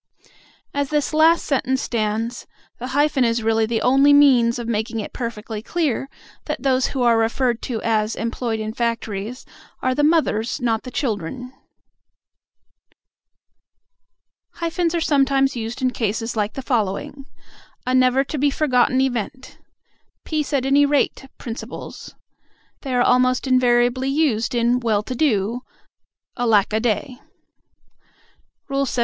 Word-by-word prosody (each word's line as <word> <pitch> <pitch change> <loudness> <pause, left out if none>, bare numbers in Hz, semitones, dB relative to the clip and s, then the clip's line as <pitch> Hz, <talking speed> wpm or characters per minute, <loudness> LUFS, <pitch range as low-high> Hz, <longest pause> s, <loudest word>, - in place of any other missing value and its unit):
As 285 -1 -1
this 300 0 -1
last 320 +2 +4
sentence 265 -2 0
stands, 225 0 -2 0.3
the 250 - -5
hyphen 285 0 +2
is 230 -1 0
really 225 0 +2
the 225 -1 -1
only 275 +3 +5
means 255 -5 +5
of 240 -1 -5
making 225 0 -2
it 210 - -6
perfectly 225 -3 -5
clear 280 -2 -2 0.4
that 300 -4 -4
those 260 -1 +2
who 260 -3 -2
are 235 -1 +4
referred 235 +1 0
to 235 -3 -2
as 220 -1 0
employed 230 0 -3
in 215 0 -4
factories 230 -1 -3 0.3
are 255 - 0
the 290 - 0
mothers, 295 -7 +1
not 230 -3 0
the 255 - -8
children. 250 - -4 3.0
Hyphens 335 0 -1
are 335 - 0
sometimes 275 -2 +2
used 235 +3 -5
in 255 - +2
cases 225 0 -2
like 210 -1 -1
the 270 - -6
following: 245 +4 -2 0.6
"A 255 - 0
never 255 +1 +4
to 290 +1 -5
be 290 +1 +3
forgotten 260 -3 +2
event," 260 +1 -3 0.7
"peace 305 -2 -2
at 275 -3 0
any 280 +2 +4
rate 285 -1 +1
principles." 230 -1 -8 0.7
They 265 -3 -3
are 245 - +3
almost 255 +1 +2
invariably 255 0 +2
used 270 -6 0
in 240 +1 +2
"well 220 -4 0
to 255 - -5
do," 235 -4 0 0.8
"alack 220 -5 +2
a 220 - +2
day." 245 +3 -2 1.5
LXXII. 275 -2 -1
250 Hz, 135 wpm, -21 LUFS, 225-275 Hz, 3.0 s, only